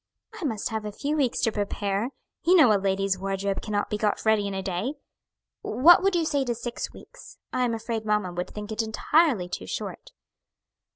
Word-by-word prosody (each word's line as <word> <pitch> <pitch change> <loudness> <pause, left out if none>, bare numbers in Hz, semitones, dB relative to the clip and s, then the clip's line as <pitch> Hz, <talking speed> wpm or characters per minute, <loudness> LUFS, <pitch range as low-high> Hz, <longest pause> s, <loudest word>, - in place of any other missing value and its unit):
"I - - -2
must 225 -4 -2
have 220 -2 -3
a 210 - -4
few 290 +8 -2
weeks 275 -6 +1
to 225 - +2
prepare; 205 +1 -1 0.3
you 355 +2 +5
know 260 -11 +7
a 200 - +2
lady's 195 -1 0
wardrobe 195 0 -2
cannot 205 -2 -2
be 210 - -1
got 210 0 0
ready 215 -2 +3
in 200 - -4
a 190 - -3
day. 195 +10 -2 0.7
What 325 - +6
would 390 -1 +2
you 335 -2 +2
say 285 -3 +1
to 240 -1 -1
six 240 +1 -5
weeks? - - -14 0.2
I 255 0 +2
am 230 -2 0
afraid 225 0 -3
mamma 210 -4 0
would 180 +1 -3
think 210 0 -7
it 220 - 0
entirely 225 - +2
too 180 - -6
short." - - -5
220 Hz, 205 wpm, -26 LUFS, 200-255 Hz, 0.7 s, know